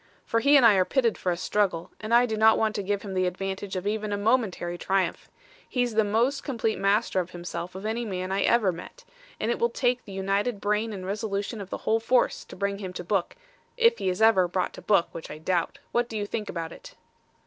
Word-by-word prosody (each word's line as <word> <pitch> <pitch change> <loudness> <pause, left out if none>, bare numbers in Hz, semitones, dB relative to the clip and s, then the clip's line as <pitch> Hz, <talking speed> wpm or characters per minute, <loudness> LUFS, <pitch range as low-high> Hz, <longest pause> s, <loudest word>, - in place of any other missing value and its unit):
For 230 - +1
he 280 +4 +6
and 260 - +6
I 225 - +8
are 185 - +5
pitted 235 +2 +1
for 180 - -1
a 170 - -2
struggle, 180 -2 0
and 215 +1 -6
I 240 +1 +6
do 220 -2 -2
not 220 +1 +5
want 220 -1 +1
to 205 - -2
give 200 +1 -2
him 200 -2 -6
the 185 -1 +1
advantage 190 +2 -4
of 185 +1 -3
even 215 0 -1
a 205 - 0
momentary 205 -5 0
triumph. 190 +1 -1 0.4
He's 245 -2 0
the 220 0 +3
most 235 +7 +1
complete 230 -5 -1
master 200 0 +2
of 180 -1 -3
himself 175 0 -6
of 190 +2 -7
any 225 +2 -1
man 185 -4 -4
I 195 +1 +1
ever 220 -4 +3
met, 180 - -11 0.3
and 225 - 0
it - - -2
will 235 - +2
take 245 0 0
the 200 - -11
united 195 +3 -1
brain 210 +2 0
and 190 -3 -6
resolution 200 +2 -3
of 195 - -8
the - - -3
whole 225 +1 +3
force 240 +2 +1
to - - -11
bring 200 +1 -2
him 185 -3 -6
to 180 - -6
book 185 0 -1 0.4
if 465 -1 +4
he 190 - 0
ever 190 0 +4
is 175 - -7
brought 185 0 -1
to - - -10
book, 200 -5 +2
which 165 - -8
I 150 - -7
doubt. 170 +2 -1
What 240 0 0
do 220 - -4
you 205 - -2
think 210 0 -4
about 165 -1 -4
it?" - - -12
205 Hz, 245 wpm, -26 LUFS, 185-230 Hz, 0.4 s, I